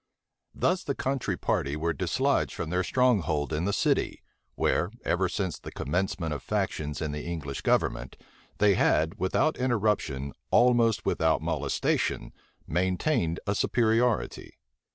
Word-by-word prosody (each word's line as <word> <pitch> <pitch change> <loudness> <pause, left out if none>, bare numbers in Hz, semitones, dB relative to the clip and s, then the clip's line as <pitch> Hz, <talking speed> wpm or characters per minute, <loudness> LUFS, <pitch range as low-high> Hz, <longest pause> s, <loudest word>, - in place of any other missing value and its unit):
Thus 180 0 +1
the 140 - -2
country 130 -9 -1
party 70 +2 -1
were 80 +2 -1
dislodged 70 - 0
from 80 - -4
their 90 +1 +1
stronghold 90 - +1
in 80 +3 -1
the 100 - +1
city; - - 0 0.3
where, 85 - +1 0.2
ever 90 +1 +1
since 95 -2 -3
the - - -9
commencement 85 +1 -2
of 70 - -5
factions 75 0 -2
in 75 - -2
the 75 0 -5
English 75 -5 -4
government, - - 0 0.4
they 105 -1 +5
had, 80 -3 +2
without 150 +11 +1
interruption, 105 - 0 0.2
almost 120 -2 +4
without - - +1
molestation, - - -1 0.3
maintained 90 - 0
a 100 - +1
superiority. 115 +1 +1
90 Hz, 130 wpm, -28 LUFS, 80-115 Hz, 0.4 s, they